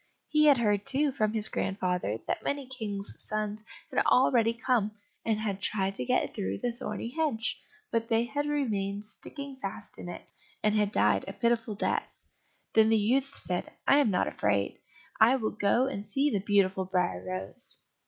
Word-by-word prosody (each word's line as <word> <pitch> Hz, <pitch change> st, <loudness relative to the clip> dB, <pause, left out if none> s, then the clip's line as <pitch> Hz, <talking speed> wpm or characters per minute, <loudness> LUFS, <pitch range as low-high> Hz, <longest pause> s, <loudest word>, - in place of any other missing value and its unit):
He 305 Hz, 0 st, +4 dB
had 285 Hz, -3 st, +7 dB
heard, 205 Hz, -4 st, +2 dB
too, 280 Hz, +2 st, +2 dB
from 215 Hz, -5 st, 0 dB
his 220 Hz, -1 st, +3 dB
grandfather, 180 Hz, -, -1 dB
that -, -, -2 dB
many 280 Hz, -1 st, -2 dB
kings' 215 Hz, -6 st, -4 dB
sons 215 Hz, 0 st, -3 dB, 0.3 s
had -, -, +2 dB
already 240 Hz, -3 st, +4 dB
come, 230 Hz, -3 st, 0 dB, 0.3 s
and 220 Hz, -2 st, +1 dB
had 200 Hz, -3 st, -2 dB
tried 195 Hz, -1 st, 0 dB
to 125 Hz, -, -3 dB
get -, -, +1 dB
through 95 Hz, +1 st, -2 dB
the 240 Hz, -, -1 dB
thorny 235 Hz, -1 st, -5 dB
hedge, 280 Hz, -7 st, -1 dB, 0.3 s
but 230 Hz, -1 st, 0 dB
they 225 Hz, 0 st, +3 dB
had 290 Hz, +4 st, -2 dB
remained 210 Hz, -8 st, -1 dB
sticking 280 Hz, +5 st, -5 dB
fast 265 Hz, -, -6 dB
in -, -, -6 dB
it, -, -, -7 dB, 0.4 s
and 210 Hz, -, +3 dB
had 210 Hz, -1 st, +2 dB
died -, -, +3 dB
a -, -, -5 dB
pitiful 235 Hz, -2 st, 0 dB
death. -, -, -1 dB, 0.6 s
Then 220 Hz, 0 st, +6 dB
the 225 Hz, -, +5 dB
youth 260 Hz, +6 st, +1 dB
said, 180 Hz, -1 st, -1 dB, 0.2 s
"I 280 Hz, -, +6 dB
am 275 Hz, -6 st, +4 dB
not 185 Hz, -, +1 dB
afraid, 100 Hz, -1 st, 0 dB, 0.4 s
I 230 Hz, +4 st, +7 dB
will 220 Hz, -5 st, -1 dB
go 220 Hz, +5 st, +2 dB
and 265 Hz, -7 st, -3 dB
see 275 Hz, +7 st, +1 dB
the 205 Hz, -, +1 dB
beautiful 195 Hz, -1 st, +2 dB
Briar 180 Hz, -, 0 dB
rose." 95 Hz, +1 st, -5 dB
215 Hz, 180 wpm, -29 LUFS, 200-255 Hz, 0.6 s, had